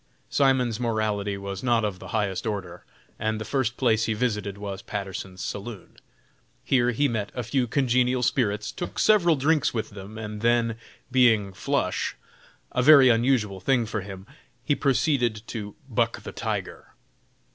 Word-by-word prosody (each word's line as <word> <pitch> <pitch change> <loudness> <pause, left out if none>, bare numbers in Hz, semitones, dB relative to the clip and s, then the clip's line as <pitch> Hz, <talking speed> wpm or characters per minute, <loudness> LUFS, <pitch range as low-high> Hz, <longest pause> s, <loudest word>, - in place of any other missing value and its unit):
Simon's 130 -5 +2
morality 110 -4 -1
was 100 -1 -6
not 120 -3 +2
of 95 -3 -3
the - - -9
highest 100 -3 -1
order, 100 -3 -5 0.4
and 110 0 -1
the 110 - -5
first 130 -3 -1
place 110 -4 +2
he 110 - 0
visited 105 -4 -2
was 100 -1 -6
Patterson's 95 -2 -6
saloon. 100 -1 -7 0.7
Here 125 -2 +2
he 140 +4 +2
met 110 -5 -3
a 125 - -2
few 125 +2 0
congenial 125 -1 +2
spirits, 105 -5 0
took 175 - -6
several 175 -7 +4
drinks 145 -1 +1
with 110 -1 -3
them, 100 +2 -10
and 105 -1 -6
then, 115 -1 +2 0.3
being 115 -6 +4
"flush," 95 - -1 0.6
a 125 - +1
very 135 -1 +8
unusual 115 -4 +2
thing 120 +5 +2
for 110 -1 -3
him 95 -1 -9 0.4
he 145 - +2
proceeded 125 -5 +1
to 105 -3 -6
"buck - - -1
the - - -6
tiger." - - -4
115 Hz, 155 wpm, -25 LUFS, 105-125 Hz, 0.7 s, very